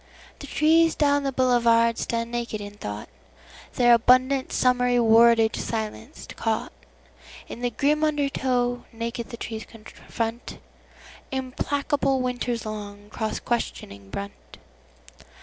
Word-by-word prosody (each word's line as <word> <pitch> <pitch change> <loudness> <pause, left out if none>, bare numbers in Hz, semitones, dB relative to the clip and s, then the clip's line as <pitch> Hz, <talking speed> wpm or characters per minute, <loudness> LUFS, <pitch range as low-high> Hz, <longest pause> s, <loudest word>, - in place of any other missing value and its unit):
The - - -9
trees 325 +1 +3
down 285 -1 +2
the 275 -1 -1
boulevard 235 -3 +3
stand 230 0 -2
naked 235 -2 -3
in 205 0 -8
thought, 105 - -7 0.7
Their 240 -1 +5
abundant 255 +3 +3
summery 250 -1 +2
wordage 230 0 +5
silenced, 215 - -5
caughtIn - - -7
the 245 - 0
grim 295 +5 +1
undertow; 260 -5 0
naked 230 0 -5
the 235 - -8
trees 225 -1 -6
confrontImplacable 260 +4 -4
winter's 245 -2 -2
long, 205 -1 -7
cross 220 0 -3
questioning 100 - -4
brunt. 200 - -8
235 Hz, 105 wpm, -25 LUFS, 220-255 Hz, 0.7 s, Their